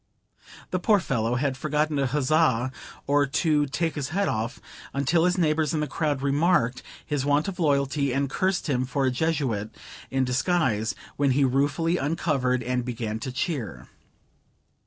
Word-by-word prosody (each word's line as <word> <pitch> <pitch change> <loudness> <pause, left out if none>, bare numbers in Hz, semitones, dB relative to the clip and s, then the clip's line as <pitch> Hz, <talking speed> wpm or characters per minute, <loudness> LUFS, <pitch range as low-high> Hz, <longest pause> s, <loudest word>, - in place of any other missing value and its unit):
The 185 - 0
poor 205 +3 +4
fellow 120 -8 -1
had 135 +1 0
forgot 150 +3 0
to 140 -3 0
huzzah 130 -2 +2 0.3
or 145 0 +3
to 150 +1 +1
take 155 +4 -1
his 140 -2 -3
hat 195 +5 0
off, 115 +3 -2 0.4
until 160 +5 +2
his 180 0 +2
neighbors 160 -1 +1
in - - 0
the 150 - 0
crowd 145 -3 -2
remarked 140 -3 +2 0.2
his 145 -3 -1
want 145 +3 +2
of 195 -2 -5
loyalty, 140 -2 +1
and 140 +2 0
cursed 185 +7 -1
him 130 -4 +1
for 135 +2 -1
a 130 - +2
Jesuit 130 -7 -1 0.4
in 135 0 +1
disguise, 125 - +1 0.2
when 140 -1 +2
he 140 - +4
ruefully 145 +6 +1
uncovered 135 -5 0
and 125 +1 -1
began 115 -3 -4
to 130 - -5
cheer. 120 - -4
140 Hz, 160 wpm, -26 LUFS, 125-155 Hz, 0.4 s, poor